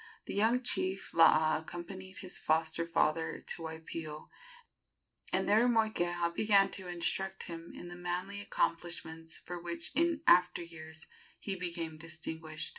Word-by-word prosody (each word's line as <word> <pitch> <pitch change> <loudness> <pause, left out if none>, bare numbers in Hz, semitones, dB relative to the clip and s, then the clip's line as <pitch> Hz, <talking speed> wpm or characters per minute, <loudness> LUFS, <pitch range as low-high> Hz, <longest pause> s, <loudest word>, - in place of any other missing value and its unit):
The - - -5
young 225 +5 +3
chief 190 -5 0
Laa 155 -1 +6
accompanied 185 +3 -7
his 185 -2 -4
foster 160 +1 +1
father 165 -1 +1
to - - -6
Waipio, 160 -1 -6 1.0
and - - +1
there 220 +4 +5
Moikeha 175 -7 +2
began 200 0 +4
to 190 -2 -7
instruct 190 +2 -2
him 170 -1 -7
in 175 - -8
the 175 - -7
manly 180 +3 -3
accomplishments 165 -3 -2
for 175 -1 -7
which 170 0 -3
in 330 +1 +2
after 180 - +5
years 160 -1 -9 0.3
he 195 - -3
became 170 -3 -4
distinguished. 160 -1 -6
175 Hz, 135 wpm, -33 LUFS, 165-190 Hz, 1.0 s, Laa